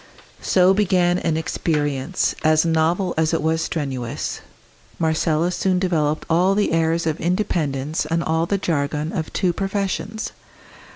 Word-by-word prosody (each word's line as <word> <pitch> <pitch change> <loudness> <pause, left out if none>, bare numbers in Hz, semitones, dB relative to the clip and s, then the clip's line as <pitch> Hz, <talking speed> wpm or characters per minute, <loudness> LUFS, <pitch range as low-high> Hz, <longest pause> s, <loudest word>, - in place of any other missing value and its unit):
So 185 0 +4
began 180 -3 +2
an 160 -2 0
experience, 150 0 -1
as 155 +1 +4
novel 165 +3 +1
as 160 +1 +2
it - - -1
was 160 +1 +1
strenuous. 130 -8 -3 0.6
Marcella 160 +1 +1
soon 185 0 +1
developed 155 -5 0
all 180 +4 +3
the 205 - +1
airs 165 0 +1
of 160 -1 -1
independence 160 -6 -1
and 165 +1 0
all 160 +1 0
the 200 - +1
jargon 150 -3 -1
of 160 -5 -3
two 180 -2 0
professions. 200 +3 -3
165 Hz, 135 wpm, -21 LUFS, 155-180 Hz, 0.6 s, So